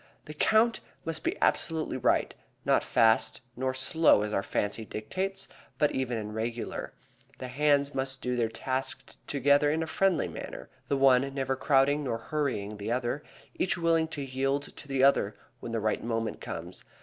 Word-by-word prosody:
The 150 Hz, -, -8 dB
count 220 Hz, +8 st, +3 dB, 0.3 s
must 165 Hz, -1 st, -3 dB
be -, -, -1 dB
absolutely 160 Hz, -4 st, +1 dB
right, -, -, +2 dB, 0.3 s
not -, -, +3 dB
fast 110 Hz, 0 st, +3 dB
nor 130 Hz, +1 st, -1 dB
slow 130 Hz, -3 st, +4 dB
as 105 Hz, 0 st, -3 dB
our 100 Hz, -, +2 dB
fancy 105 Hz, +2 st, -2 dB
dictates, 190 Hz, -, -3 dB, 0.3 s
but 150 Hz, -, +3 dB
even 125 Hz, -3 st, -1 dB
and 105 Hz, -1 st, -5 dB
regular. 115 Hz, +2 st, -4 dB, 0.4 s
The 130 Hz, -, -6 dB
hands 145 Hz, +1 st, +2 dB
must 135 Hz, 0 st, -2 dB
do 125 Hz, -1 st, -2 dB
their 115 Hz, -2 st, +1 dB
task 130 Hz, +3 st, -4 dB
together 145 Hz, +1 st, +3 dB
in 160 Hz, +2 st, +1 dB
a -, -, -2 dB
friendly 185 Hz, +1 st, +1 dB
manner; -, -, -8 dB, 0.2 s
the 140 Hz, -, +1 dB
one 135 Hz, 0 st, +4 dB
never 135 Hz, -1 st, 0 dB
crowding 140 Hz, +2 st, +3 dB
nor 120 Hz, -4 st, -1 dB
hurrying 115 Hz, -6 st, -2 dB
the 105 Hz, +2 st, -4 dB
other, 125 Hz, +3 st, -1 dB, 0.3 s
each 185 Hz, -, 0 dB
willing 165 Hz, -1 st, +2 dB
to 150 Hz, -3 st, -5 dB
yield 135 Hz, +2 st, -2 dB
to -, -, -10 dB
the 135 Hz, -1 st, +1 dB
other 120 Hz, -7 st, +4 dB, 0.2 s
when 115 Hz, -, -6 dB
the 115 Hz, -, 0 dB
right 110 Hz, 0 st, 0 dB
moment 115 Hz, -1 st, -2 dB
comes. 85 Hz, +2 st, -6 dB
135 Hz, 175 wpm, -29 LUFS, 115-145 Hz, 0.4 s, slow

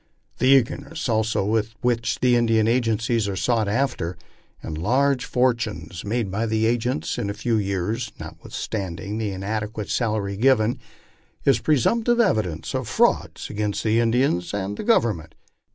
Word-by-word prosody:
The 130 Hz, -, +2 dB
eagerness 140 Hz, +4 st, +2 dB
also 110 Hz, -3 st, +1 dB
with 110 Hz, +1 st, 0 dB
which 120 Hz, -2 st, 0 dB
Indian 115 Hz, -3 st, +3 dB
agencies 115 Hz, -2 st, +1 dB
are 100 Hz, -, -2 dB
sought 110 Hz, +2 st, +1 dB
after, 100 Hz, -6 st, -1 dB, 0.5 s
and 80 Hz, -, -5 dB
large 130 Hz, -, +1 dB
fortunes 115 Hz, -10 st, -1 dB
made 105 Hz, -1 st, -2 dB
by 110 Hz, +4 st, -1 dB
the 110 Hz, 0 st, +1 dB
agents 115 Hz, -7 st, -1 dB
in 100 Hz, -, -2 dB
a 100 Hz, -, -3 dB
few 120 Hz, 0 st, 0 dB
years, 100 Hz, +3 st, -2 dB
notwithstanding 100 Hz, 0 st, -5 dB
the 110 Hz, -2 st, -1 dB
inadequate 105 Hz, +2 st, -4 dB
salary 105 Hz, -4 st, -1 dB
given, 120 Hz, 0 st, +3 dB, 0.7 s
is 135 Hz, -4 st, +4 dB
pre 150 Hz, +5 st, +2 dB
sumptive 235 Hz, -, +2 dB
evidence 105 Hz, -, 0 dB
of -, -, -2 dB
frauds -, -, +1 dB
against 105 Hz, -1 st, -2 dB
the 110 Hz, +1 st, +2 dB
Indians 115 Hz, -6 st, +1 dB
and 100 Hz, 0 st, -3 dB
the -, -, -5 dB
Government. 105 Hz, -, +1 dB
110 Hz, 145 wpm, -23 LUFS, 100-125 Hz, 0.7 s, is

